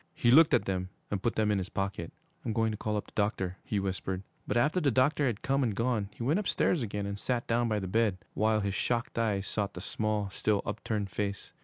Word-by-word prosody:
He 120 Hz, -, +3 dB
looked 155 Hz, 0 st, +7 dB
at 120 Hz, -, +1 dB
them 95 Hz, -1 st, -2 dB, 0.2 s
and 100 Hz, -2 st, -1 dB
put 115 Hz, -, 0 dB
them 105 Hz, -1 st, +2 dB
in 100 Hz, -, +2 dB
his 95 Hz, 0 st, -4 dB
pocket. 95 Hz, -4 st, -3 dB, 0.3 s
'I'm 115 Hz, -, -2 dB
going 115 Hz, 0 st, +2 dB
to 105 Hz, -, -4 dB
call 105 Hz, 0 st, -1 dB
up 105 Hz, -, -3 dB
the -, -, -18 dB
doctor,' 95 Hz, -3 st, -1 dB
he 105 Hz, -, -1 dB
whispered. 95 Hz, -1 st, -3 dB, 0.2 s
But -, -, +1 dB
after 155 Hz, +9 st, +3 dB
the 145 Hz, -, +3 dB
doctor 140 Hz, +3 st, +3 dB
had 115 Hz, -4 st, -2 dB
come 135 Hz, +1 st, +2 dB
and 115 Hz, -6 st, 0 dB
gone, 115 Hz, -3 st, 0 dB
he -, -, -5 dB
went 150 Hz, -, +2 dB
upstairs 180 Hz, -5 st, +1 dB
again 105 Hz, -3 st, -3 dB
and 100 Hz, 0 st, -4 dB
sat 120 Hz, +1 st, -1 dB
down 120 Hz, +1 st, +1 dB
by 105 Hz, -, +1 dB
the 95 Hz, -2 st, -3 dB
bed, 105 Hz, -1 st, +2 dB, 0.2 s
while 110 Hz, 0 st, +2 dB
his 100 Hz, -1 st, -1 dB
shocked 115 Hz, +2 st, -1 dB
eyes 105 Hz, -4 st, +1 dB
sought 100 Hz, -2 st, -2 dB
the -, -, -5 dB
small, 105 Hz, +1 st, -1 dB
still 105 Hz, +1 st, +1 dB
upturned 105 Hz, -2 st, -2 dB
face. 100 Hz, +1 st, -3 dB
105 Hz, 240 wpm, -30 LUFS, 100-120 Hz, 0.3 s, looked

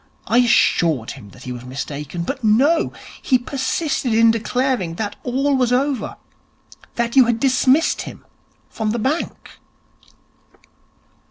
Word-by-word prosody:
I 240 Hz, -, +3 dB
assured 165 Hz, -, +2 dB
him 100 Hz, -, -11 dB
that 100 Hz, -, -15 dB
he 125 Hz, -, -6 dB
was 120 Hz, -1 st, -7 dB
mistaken, 140 Hz, +5 st, -5 dB
but 170 Hz, -, -5 dB
no! 270 Hz, +10 st, +3 dB, 0.3 s
He 260 Hz, -, +3 dB
persisted 260 Hz, 0 st, -2 dB
in 230 Hz, 0 st, +6 dB
declaring 230 Hz, -5 st, -1 dB
that 205 Hz, +2 st, -4 dB
all 270 Hz, +3 st, 0 dB
was 250 Hz, -2 st, +1 dB
over, 260 Hz, -1 st, 0 dB, 0.8 s
that 235 Hz, +1 st, -1 dB
you 260 Hz, -2 st, +7 dB
had 230 Hz, -1 st, 0 dB
dismissed 265 Hz, +4 st, +2 dB
him -, -, -10 dB, 0.4 s
from 220 Hz, -1 st, -3 dB
the -, -, -1 dB
bank.' 270 Hz, +9 st, -3 dB
240 Hz, 135 wpm, -20 LUFS, 190-265 Hz, 0.8 s, you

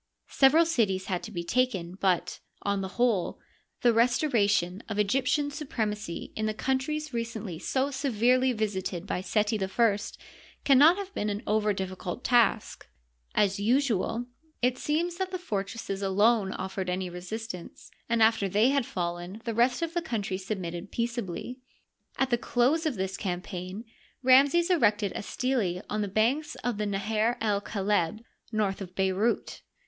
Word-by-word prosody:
Several 295 Hz, +5 st, +5 dB
cities 205 Hz, -, +1 dB
had 180 Hz, -2 st, -2 dB
to 220 Hz, -, -8 dB
be 170 Hz, -4 st, -4 dB
taken, 190 Hz, -4 st, 0 dB
but, 185 Hz, -2 st, 0 dB, 0.2 s
on 200 Hz, -1 st, 0 dB
the 190 Hz, -, -3 dB
whole, 235 Hz, -7 st, +1 dB, 0.4 s
the 240 Hz, -1 st, +5 dB
restoration 220 Hz, -, +2 dB
of 210 Hz, -, -3 dB
Egyptian 260 Hz, +7 st, +1 dB
supremacy 215 Hz, -, -4 dB
in 215 Hz, 0 st, -1 dB
the 215 Hz, -, -2 dB
countries 270 Hz, +5 st, -1 dB
recently 225 Hz, -7 st, -4 dB
so 270 Hz, +8 st, 0 dB
severely 255 Hz, -1 st, +2 dB
visited 190 Hz, -5 st, -2 dB
by 180 Hz, -, -2 dB
Seti 210 Hz, +1 st, 0 dB
I 205 Hz, +2 st, +2 dB, 0.6 s
can 270 Hz, -2 st, +5 dB
not 320 Hz, +6 st, +7 dB
have 395 Hz, -1 st, -6 dB
been 210 Hz, -, -1 dB
an 205 Hz, +3 st, -3 dB
over 210 Hz, 0 st, +2 dB
difficult 190 Hz, +1 st, -4 dB
taslc. 235 Hz, -3 st, +2 dB, 0.5 s
As 200 Hz, -1 st, +2 dB
usual, 235 Hz, 0 st, +1 dB, 0.3 s
it 250 Hz, +1 st, +2 dB
seems 340 Hz, +3 st, -1 dB
that 380 Hz, 0 st, -2 dB
the 370 Hz, -, -3 dB
fortresses 200 Hz, -, -4 dB
alone 200 Hz, +1 st, +3 dB
offered 190 Hz, -1 st, -4 dB
any 185 Hz, +1 st, -1 dB
resistance, 180 Hz, +1 st, -7 dB, 0.2 s
and 230 Hz, -1 st, +4 dB
after 220 Hz, -3 st, +3 dB
they 210 Hz, +6 st, +4 dB
had 275 Hz, -3 st, +1 dB
fallen 175 Hz, +2 st, -4 dB
the 230 Hz, -, -2 dB
rest 240 Hz, +8 st, +2 dB
of 335 Hz, 0 st, -3 dB
the 345 Hz, -, 0 dB
country 210 Hz, -, -3 dB
submitted 185 Hz, -2 st, -5 dB
peace 235 Hz, +1 st, -1 dB
ably. 235 Hz, +6 st, -6 dB, 0.6 s
At 265 Hz, -1 st, +1 dB
the 240 Hz, -, +2 dB
close 280 Hz, +9 st, +2 dB
of 290 Hz, -, -1 dB
this 190 Hz, -1 st, -3 dB
campaign 185 Hz, +2 st, -5 dB, 0.4 s
Ramses 280 Hz, +7 st, +5 dB
erected 210 Hz, -, +3 dB
a -, -, -4 dB
stele 205 Hz, -6 st, -1 dB
on 210 Hz, +1 st, 0 dB
the 205 Hz, -, -1 dB
banks 255 Hz, +10 st, +1 dB
of 240 Hz, -4 st, -1 dB
the 210 Hz, -, 0 dB
Naher 215 Hz, +4 st, 0 dB
el 205 Hz, -2 st, +1 dB
Kaleb, 205 Hz, -1 st, -1 dB, 0.3 s
north 210 Hz, -3 st, -1 dB
of 180 Hz, -1 st, -8 dB
Bey 190 Hz, 0 st, +2 dB
rout. 210 Hz, +6 st, -1 dB
215 Hz, 160 wpm, -28 LUFS, 195-255 Hz, 0.6 s, not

